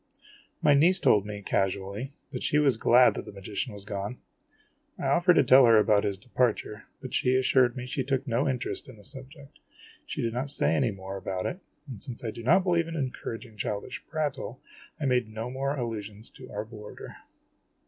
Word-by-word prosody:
My 145 - +6
niece 170 +7 +5
told 105 -1 +3
me, 105 -1 -6
casually, 100 +6 -1 0.2
that 125 - -5
she 150 - +1
was 140 -5 +4
glad 120 +2 +5
that - - -6
the - - -9
magician 100 +5 -4
was 100 -1 -9
gone. 105 +3 -4 0.8
I - - -5
offered 175 0 +4
to - - +6
tell 130 +1 +7
her 115 -1 +7
about 105 -1 +4
his 100 -1 -1
departure, 110 -1 -1 0.2
but 130 - -7
she 125 0 +2
assured 130 -1 +3
me 125 - -4
she 130 +1 -2
took 135 0 -1
no 125 +4 +1
interest 125 0 -3
in 125 - -12
the 105 - -16
subject. 135 +5 -11 0.5
She - - -3
did 115 -1 -1
not 130 +4 -2
say 80 - +2
any 80 - +2
more 95 -1 -6
about 95 -1 -4
it, 180 - -3 0.3
and, 120 -7 -8
since 125 -2 -6
I 115 - -2
do 115 - -9
not 130 +11 +4
believe 170 -3 +2
in 165 - -5
encouraging 125 -5 -5
childish 105 0 -4
prattle, 150 -4 -3 0.4
I 145 - -2
made 125 -4 +1
no 110 +3 -5
more 135 +2 -1
allusions 110 -3 -5
to - - -13
our 105 +1 -4
boarder. 105 -2 -10
120 Hz, 200 wpm, -28 LUFS, 105-135 Hz, 0.8 s, tell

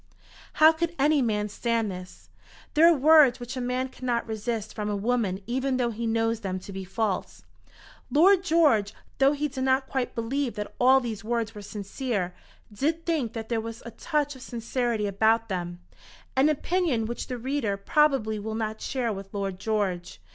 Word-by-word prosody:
How 310 +1 +7
could 340 +1 -2
any 290 +1 +3
man 210 -3 0
stand 225 0 -1
this? 180 0 -10 0.4
There 320 +2 +6
are 325 - +2
words 290 -3 +6
which 245 +2 -6
a 255 - -3
man 250 +1 -1
cannot 250 -2 -2
resist 220 0 -3
from 210 -1 -3
a 205 - -1
woman 200 -3 -1
even 260 +3 -1
though 240 -2 0
he 230 +1 -3
knows 225 0 +1
them 190 -4 -3
to 195 - -9
be 190 0 -5
false. 195 +1 -3 0.7
Lord 370 +5 +5
George, 295 - +3 0.2
though 275 +1 +5
he 295 +1 -1
did 260 -2 -4
not 265 0 +2
quite 265 -3 -2
believe 245 +3 -2
that 210 0 -5
all 260 +2 +6
these 225 -4 -5
words 230 -1 -2
were 210 - -8
sincere, 205 -1 -3 0.4
did 320 +9 -1
think 300 -10 -1
that 225 -1 -6
there 230 -2 0
was 230 0 -8
a 235 - -7
touch 295 +1 -1
of 260 - -13
sincerity 235 -2 -2
about 220 +3 +2
them 175 -2 -4 0.5
an 270 +3 +4
opinion 310 -6 0
which 235 +2 -5
the 250 - -4
reader 245 -5 -1
probably 220 -2 +2
will 220 +1 -4
not 220 -1 -3
share 245 -4 -1
with 195 0 -8
Lord 195 -2 -3
George. 195 - -2
235 Hz, 185 wpm, -26 LUFS, 210-270 Hz, 0.7 s, How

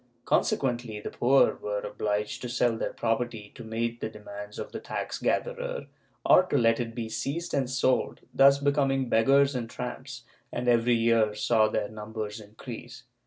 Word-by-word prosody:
Consequently 120 -5 0
the - - -6
poor 135 +3 +4
were 105 0 -3
ol)liged 105 0 -2
to 125 - -4
sell 120 -1 +1
their - - -2
property 115 -2 -2
to 120 - -10
meet 115 +1 -3
the - - -2
demands 105 -1 -9
of - - -6
the - - -5
tax - - -4
gatherer, - - -1 0.4
or - - +7
to 185 -6 -1
let 115 -2 +3
it 115 -1 -4
be 115 -2 -3
seized 145 +9 -3
and 135 -3 0
sold, 130 0 +1
thus 140 +1 +6
becoming 140 -2 +1
beggars 135 +5 +4
and 120 -3 -3
tramps, 125 +1 -6 0.3
and 125 0 -3
every 120 0 +4
year 115 -2 +3
saw 110 -1 +3
their 105 -1 -1
numbers 110 0 -6
increase. 115 +3 -10
120 Hz, 165 wpm, -28 LUFS, 110-135 Hz, 0.4 s, or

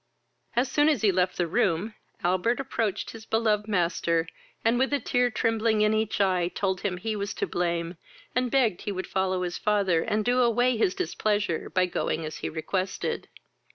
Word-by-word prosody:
As 245 +3 +2
soon 295 +3 +3
as 285 -9 +1
he 205 - +5
left 180 0 0
the 175 - +1
room, 195 +2 0 0.3
Albert 185 +8 +1
approached 230 -7 -2
his 225 -1 -10
beloved 215 -1 +1
master, 170 -4 +1 0.4
and, 230 +2 +3
with 265 +2 +2
a 285 - +2
tear 245 -2 +1
trembling 220 -1 +1
in 210 0 +3
each 220 -1 0
eye, 185 -3 +2
told 190 0 -2
him 190 -3 -1
he 215 +4 -3
was 200 -1 -3
to - - -1
blame, 170 0 -2 0.4
and 250 0 +1
begged 235 -8 +2
he 205 - -3
would 190 -1 -4
follow 185 -1 0
his 175 -1 -3
father, 200 -6 +2
and 210 +4 -1
do 250 +1 +3
away 245 +1 +3
his 200 -5 +1
displeasure, 205 0 -1
by 185 -1 +2
going 165 -2 -2
as 155 - -6
he - - -4
requested. 185 +4 -3
205 Hz, 190 wpm, -27 LUFS, 180-230 Hz, 0.4 s, he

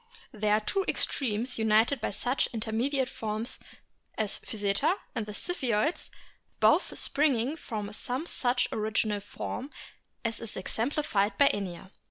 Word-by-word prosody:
They 215 -3 -1
are 210 +1 +5
the 215 - -16
two 390 -1 +1
extremes 240 -1 0
united 220 +4 +4
by - - 0
such 245 +6 0
intermediate 240 +4 0
forms 220 +1 -3 0.6
as 215 -2 +1
Physeter, 205 - +1 0.2
and 220 -2 -2
the - - -5
Ziphioids, 255 - 0 0.5
both - - +4
springing 275 -2 +1
from 210 -8 -5
some 255 +7 -2
such 250 -6 +1
original 215 -1 0
form 225 +6 -5 0.6
as 230 -1 -1
is 230 -2 -6
exemplified 220 0 0
by 280 - +7
Inia. 190 -2 -4
225 Hz, 135 wpm, -29 LUFS, 210-260 Hz, 0.6 s, by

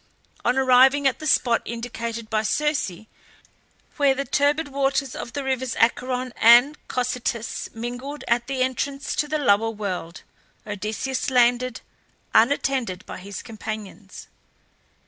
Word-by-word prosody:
On 245 +2 +1
arriving 265 +2 +5
at 265 -2 +2
the 310 - -4
spot 240 -4 +3
indicated 230 -1 -5
by 215 -1 0
Circe, 280 - -1 0.9
where 280 -3 +3
the 275 +1 -2
turbid 290 +2 +1
waters 275 -1 0
of 235 - -7
the 285 - -3
rivers 260 -2 -2
Acheron 250 +2 0
and 240 +6 +7
Cocytus 245 -2 -2
mingled 245 +5 -6
at 235 0 +1
the 265 -1 0
entrance 275 +2 -2
to 300 - 0
the 310 +1 -1
lower 225 -5 +3
world, 190 -6 -5 0.4
Odysseus 215 +7 -3
landed, 245 0 +2 0.5
unattended 240 -5 +2
by - - -8
his 200 +1 -8
companions. 215 -2 -8
250 Hz, 125 wpm, -23 LUFS, 225-275 Hz, 0.9 s, and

